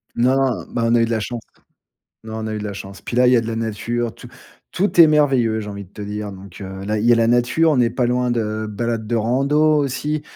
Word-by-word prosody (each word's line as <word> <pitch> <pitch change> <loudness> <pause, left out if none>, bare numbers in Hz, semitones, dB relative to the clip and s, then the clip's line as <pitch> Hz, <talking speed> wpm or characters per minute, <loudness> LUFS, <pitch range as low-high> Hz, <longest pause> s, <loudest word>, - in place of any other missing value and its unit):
Non, 125 +3 +3
non. 135 -4 0
Bah, 115 - -2
on 115 +1 +3
a 115 - +4
eu 115 - +3
de 115 - -4
la 110 - +1
chance. 120 +2 -5 0.8
Non, 110 0 -6
on - - -3
a 110 - -3
eu 105 - -3
de 105 - -6
la 105 - -4
chance. 100 0 -9
Puis 120 - -6
là, 125 0 +5
il 125 - +5
y - - +6
a - - +4
de 115 - -6
la 115 0 -3
nature, 115 +1 -2
tout - - -12 0.4
tout 190 -2 +2
est 160 - +9
merveilleux, 135 -7 +2
j'ai 105 -1 -5
envie 100 -1 -7
de 90 - -22
te - - -11
dire. 105 0 -5
Donc, 95 0 -12
heu, 95 0 -7
là, 105 +1 -1
il 105 - -2
y 120 - +4
a - - +5
la 115 0 +3
nature, 125 +7 +3
on - - +1
n'est 120 -2 +3
pas 125 -2 0
loin 125 0 0
de 110 -2 -2
balades 115 +1 -3
de 120 - -1
rando 140 +7 +2
aussi. 150 +2 -2
115 Hz, 290 wpm, -20 LUFS, 110-125 Hz, 0.8 s, est